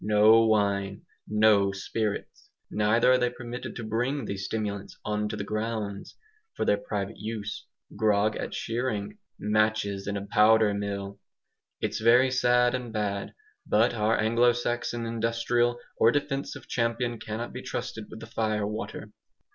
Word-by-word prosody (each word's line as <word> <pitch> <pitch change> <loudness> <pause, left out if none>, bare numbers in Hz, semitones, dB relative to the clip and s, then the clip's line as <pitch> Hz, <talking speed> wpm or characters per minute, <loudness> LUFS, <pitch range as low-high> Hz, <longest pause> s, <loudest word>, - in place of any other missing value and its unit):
No 110 +2 +6
wine, 100 -2 +1 0.2
no 105 -2 +4
spirits! 100 +2 -4 0.2
Neither 105 +4 +3
are 130 - +6
they 125 0 +2
permitted 120 0 -7
to 115 - -5
bring 120 +5 -1
these 95 -1 -4
stimulants 100 -2 -4
"on 105 0 -1
to 110 - -3
the 105 - -4
grounds" 105 -1 -4 0.4
for - - -1
their - - +3
private - - -4
use. 105 -2 -5 0.3
Grog 105 0 +2
at - - -4
shearing? 115 - -3 0.2
Matches 105 -1 0
in 100 0 -1
a 100 - -5
powder 105 0 +4
mill! 100 -1 -4 0.6
It's - - -2
very 125 +3 +5
sad 125 -1 +3
and 125 -2 -3
bad; 105 -2 -3 0.3
but 115 +4 +3
our 110 0 +1
Anglo 115 +2 +4
Saxon 120 0 -2
industrial 115 +1 0 0.2
or 115 - +5
defensive 140 0 -3
champion 115 0 -1
cannot 110 +2 -5
be - - -6
trusted 110 -1 -5
with 110 - -10
the - - -7
fire 110 -2 -1
water. 105 +2 -5
110 Hz, 145 wpm, -27 LUFS, 105-120 Hz, 0.6 s, No